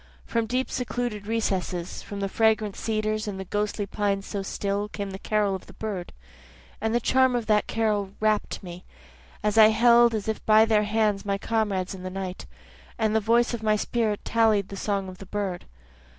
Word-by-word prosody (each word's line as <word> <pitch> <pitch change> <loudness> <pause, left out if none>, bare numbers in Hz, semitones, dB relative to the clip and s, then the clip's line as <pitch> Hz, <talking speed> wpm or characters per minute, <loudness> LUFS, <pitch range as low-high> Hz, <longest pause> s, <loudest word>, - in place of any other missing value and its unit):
From 230 -1 -1
deep 255 +3 -1
secluded 240 -4 -3
recesses, 190 -6 -2
From 200 -1 -7
the 195 - 0
fragrant 215 -1 +1
cedars 215 0 -1
and 195 -2 -4
the 190 - -5
ghostly 205 +1 -2
pines 200 -1 -1
so 200 - -4
still, 200 +1 -2
Came 200 -2 -5
the 190 - -7
carol 210 -2 +1
of 190 - -6
the - - -13
bird. 200 -5 -5 0.7
And 220 +1 0
the - - +4
charm 260 +1 +3
of 235 -2 -1
the 210 -1 +4
carol 210 -3 0
rapt 215 -1 0
me, 180 0 -9 0.6
As 210 +1 +2
I 215 - +10
held 235 +1 +5
as 210 -1 -3
if 220 - -2
by 215 0 +7
their 215 -2 +2
hands 210 -2 +1
my 200 -1 -1
comrades 200 -3 -1
in 190 - -9
the 185 - -5
night, 185 -1 -6 0.5
And 220 -2 +1
the - - +5
voice 235 +3 +2
of 235 - -3
my 215 -1 +2
spirit 215 -1 -1
tallied 220 -4 +2
the 200 - -7
song 195 -1 -2
of 185 0 -10
the 195 - -10
bird. 195 -3 -3
210 Hz, 195 wpm, -26 LUFS, 195-220 Hz, 0.7 s, I